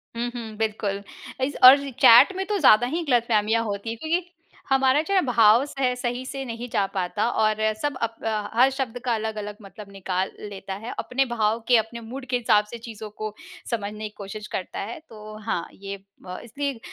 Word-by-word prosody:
हुँ, 240 +1 -2
हुँ, 220 -2 -6
बिल्कुल। 210 -2 -2 0.4
इस 275 +2 -1
और 260 +3 +11 0.2
चैट 235 +11 +8
में 385 0 -2
तो 415 -1 0
ज़्यादा 245 -4 +6
ही 330 +6 -2
गलतफ़हमियाँ 230 -2 +2
होती 205 +1 -4
हैं 230 - -4
क्योंकि 340 +3 -1 0.4
हमारा 270 +1 +4
जो 395 - -1
है 380 - +5
भाव 230 0 +5
सह 270 -3 -1
सही 245 +1 -3
से 270 +1 -5
नहीं 235 0 -6
जा 200 -2 +1
पाता 195 +3 -1
और 215 -2 +2 0.3
सब 290 -3 -1
अप 230 0 -1
अ, 215 -2 -2
हर 255 +2 +6
शब्द 260 -3 -3
का 240 - +2
अलग-अलग 215 -1 -4
मतलब 200 +1 -12
निकाल 190 -1 -2
लेता 195 -2 -7
है। - - -5
अपने 270 +2 0
भाव 225 -2 0
के, 245 -2 +6
अपने 225 +2 -2
मूड 255 +4 -8
के 250 - +2
हिसाब 220 -3 +3
से 235 - -6
चीज़ों 220 -2 -9
को 215 0 -6 0.4
समझने 210 -1 -3
की 210 - -26
कोशिश 210 +1 -7
करता 185 - -5
है। 230 +9 -5
तो 215 -1 -10
हाँ 170 - -2
ये 200 0 -7 0.3
ब 180 0 -6
इसलिए 275 +2 -4
225 Hz, 200 wpm, -24 LUFS, 210-255 Hz, 0.4 s, और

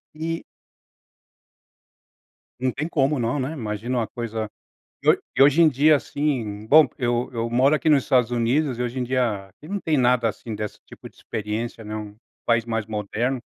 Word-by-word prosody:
E 165 +1 -3 2.2
Não 130 0 +1
tem 155 +6 -3
como 140 -3 +1
não, 120 +4 0
né, 135 +5 -2
imagina 120 -1 -3
uma 115 - 0
coisa 110 -2 -4 0.5
e - - -2
hoje - - +5 0.2
e - - +8
hoje 145 +4 +6
em 160 - +7
dia 150 +2 +5
assim 120 -9 -2
bom, 155 +5 +7
porque 125 - -7
eu 120 0 0
eu 115 0 -2
moro 130 +5 +3
aqui 155 - 0
nos 145 -4 +5
Estados 125 -4 +2
Unidos 125 +2 +1
e - - -1
hoje 125 +2 -3
em 125 - 0
dia, 120 -6 0
aqui 150 - -16
não 200 0 -3
tem 155 -4 +1
nada 125 -2 +3
assim 110 +1 -6
desse 105 0 -5
tipo - - -12
de - - -28
experiência, 110 +2 -4
né, 105 +1 -5
um 105 -1 -7 0.3
país 115 -1 +2
mais 115 -2 -1
moderno, 110 +4 -2
120 Hz, 190 wpm, -23 LUFS, 110-140 Hz, 2.2 s, e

